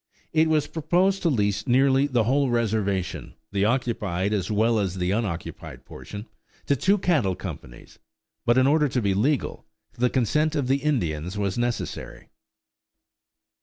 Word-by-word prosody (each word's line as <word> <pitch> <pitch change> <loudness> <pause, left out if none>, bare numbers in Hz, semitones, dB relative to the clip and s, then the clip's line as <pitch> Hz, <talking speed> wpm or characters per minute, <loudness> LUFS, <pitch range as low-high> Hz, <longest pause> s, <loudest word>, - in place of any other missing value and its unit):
It 160 0 +4
was 155 -2 +2
proposed 180 +5 +1
to 170 - +2
lease 105 -4 0
nearly 135 +2 +4
the 125 -5 +1
whole 135 +4 +2
reservation, 105 -5 -1 0.2
the 100 0 +1
occupied 105 -5 0
as 95 -4 -1
well 110 +2 +2
as 95 -3 -1
the 90 0 -1
unoccupied 100 -6 -4
portion, 105 +1 -9 0.4
to 140 - +2
two 195 +10 +2
cattle 145 - +1
companies, 70 -10 -9 0.4
but 120 +1 +3
in 130 - +5
order 150 +2 +3
to 125 - 0
be 100 -4 +1
legal, 130 +8 -1 0.3
the 125 +1 +1
consent 150 +6 +1
of 140 -4 0
the 135 +2 +3
Indians 95 - -2
was 100 -2 -1
necessary. 120 0 -4
120 Hz, 150 wpm, -25 LUFS, 100-140 Hz, 0.4 s, in